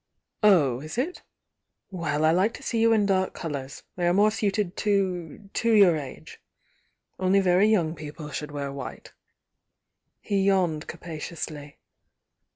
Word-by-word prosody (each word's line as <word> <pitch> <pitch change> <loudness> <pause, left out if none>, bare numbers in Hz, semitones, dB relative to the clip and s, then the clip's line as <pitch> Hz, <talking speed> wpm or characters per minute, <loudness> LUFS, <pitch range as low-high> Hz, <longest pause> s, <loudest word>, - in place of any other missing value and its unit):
"Oh 155 - +4
is 155 +8 -8
it' 315 +9 -2 0.7
Well, 155 -4 -1
I 160 - +5
like 190 +7 +2
to 275 - -11
see 235 -3 -1
you 230 0 +4
in 215 -2 +3
dark 190 -1 +1
colours 140 -4 -6
—they 175 -1 0
are 175 - +3
more 210 +2 +4
suited 205 -3 -1
to— 195 -2 -1
to 230 - +1
your 200 -6 +6
age. 140 -4 -8 0.8
Only 190 +1 +3
very 190 +1 +4
voune 165 -4 -1
people 150 0 -8
should 150 +1 -5
wear 140 -1 -4
white. 140 0 -8 0.6
' - - -57 0.3
He 200 -1 -1
yawned 185 -6 +1
capaciously. 155 -3 -7
180 Hz, 150 wpm, -26 LUFS, 155-200 Hz, 0.8 s, your